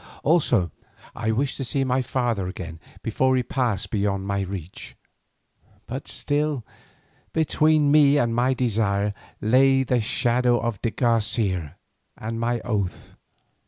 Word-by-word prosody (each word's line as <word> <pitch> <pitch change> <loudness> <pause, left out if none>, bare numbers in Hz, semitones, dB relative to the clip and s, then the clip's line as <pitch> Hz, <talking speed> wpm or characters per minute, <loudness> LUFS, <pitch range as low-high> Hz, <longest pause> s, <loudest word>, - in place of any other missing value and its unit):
Also 145 - +2 0.4
I 110 -1 -2
wished 130 +5 -1
to 135 - -3
see 135 +2 -1
my 130 0 +1
father 120 -6 -1
again 85 -3 -7 0.2
before 130 +4 +2
he 125 - +1
passed 125 -6 -1
beyond 100 -2 0
my 100 0 -1
reach. 95 -2 -7 0.9
But 130 +4 -6
still 145 -4 -1 0.7
between 155 -2 +3
me 145 -1 +6
and 120 -5 +1
my 125 +3 +2
desire 105 -4 0 0.3
lay 135 +4 +4
the 125 -2 +1
shadow 120 +2 +2
of 115 -5 -3
de 115 - 0
Garcia 105 - 0 0.4
and 115 +1 -4
my 120 0 0
oath. 100 -6 -3
120 Hz, 130 wpm, -24 LUFS, 100-130 Hz, 0.9 s, me